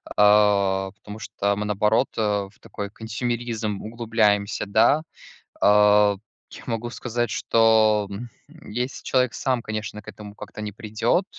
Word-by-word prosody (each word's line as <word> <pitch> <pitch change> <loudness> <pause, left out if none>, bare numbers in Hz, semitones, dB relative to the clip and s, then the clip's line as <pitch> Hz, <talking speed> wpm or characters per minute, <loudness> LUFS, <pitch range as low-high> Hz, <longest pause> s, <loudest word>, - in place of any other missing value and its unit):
а, 100 -2 +4
потому 105 +2 -11
что 100 -1 -1
мы, 105 - -2
наоборот, 105 +4 +2
э, 110 - +1
в 105 -1 -1
такой 100 -1 -6
консьюмеризм 115 -1 -3
углубляемся, 110 -3 0
да. 110 +9 +3 0.6
А, 105 0 +5 0.4
я - - -11
могу 115 0 -3
сказать, 120 -1 -3
что, 110 -2 +3
м, 110 +5 -6 0.4
если 125 +4 -4
человек 125 -3 +1
сам, 130 -4 -1
конечно, 110 -1 -5
к - - -29
этому 105 -1 -10
как-то 105 +1 -9
не 105 - -4
придет, 110 - 0
105 Hz, 135 wpm, -23 LUFS, 105-115 Hz, 0.6 s, А